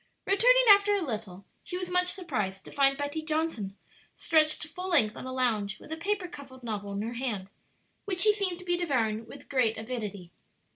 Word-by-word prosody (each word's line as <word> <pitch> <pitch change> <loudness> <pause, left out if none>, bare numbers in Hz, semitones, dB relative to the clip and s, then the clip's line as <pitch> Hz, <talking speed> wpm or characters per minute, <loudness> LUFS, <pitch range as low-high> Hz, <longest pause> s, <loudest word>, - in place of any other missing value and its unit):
Returning - - +5
after 410 0 +7
a 395 - -1
little, 210 - -6 0.2
she 360 -3 -5
was 365 -1 -5
much 360 0 +3
surprised 215 - -1
to - - -10
find 275 -1 +3
Betty 290 +2 -3
Johnson 310 -11 -2 0.4
stretched 310 -1 +2
full 360 +4 -7
length 230 -12 +3
on - - -7
a - - -4
lounge 220 -6 0
with - - -14
a - - -1
paper 385 +2 -2
covered 275 -6 -11
novel 205 -3 -4
in 200 +1 -3
her 230 +2 -4
hand, 220 -6 -3 0.5
which 375 -4 -1
she 425 -1 +7
seemed 390 -4 -2
to 365 - -13
be 350 -1 +1
devouring 230 -10 -1
with 280 - -12
great 245 -5 +1
avidity. 210 -6 -6
275 Hz, 195 wpm, -29 LUFS, 220-360 Hz, 0.5 s, after